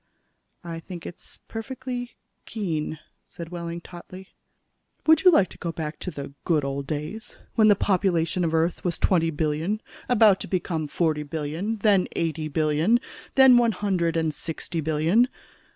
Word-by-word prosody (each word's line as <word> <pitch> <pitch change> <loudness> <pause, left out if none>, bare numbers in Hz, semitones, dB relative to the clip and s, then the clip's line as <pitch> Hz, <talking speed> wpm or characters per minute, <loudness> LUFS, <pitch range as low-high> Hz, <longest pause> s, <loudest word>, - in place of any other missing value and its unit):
"I 165 -1 -6
think 170 +1 -9
it's 175 - -10
perfectly 245 +1 -5 0.3
keen," 160 -8 -3 0.3
said 170 -1 -9
Wehling 170 -1 -5
tautly. 185 +2 -11 0.8
"Would 320 0 +6
you 370 - +9
like 200 - +5
to - - -13
go 170 - -3
back 155 -1 -5
to - - -4
the 140 -4 -7
good 155 -5 +1
old 140 0 -3
days, 155 +10 -5 0.2
when 220 -2 +5
the 205 - +7
population 180 -3 +1
of 165 - +2
the 160 - +1
Earth 165 +2 0
was 175 -2 -1
twenty 165 -3 +2
billion 160 +6 -1 0.3
about 215 -5 +5
to - - -6
become 170 -4 -2
forty 155 -1 0
billion, 160 +8 -3
then 200 -3 +3
eighty 160 -2 -1
billion, 155 +8 +2 0.4
then 265 -2 +8
one 235 -2 +3
hundred 180 -4 0
and 160 -1 0
sixty 165 +1 -5
billion? 160 - +3
170 Hz, 160 wpm, -25 LUFS, 160-205 Hz, 0.8 s, you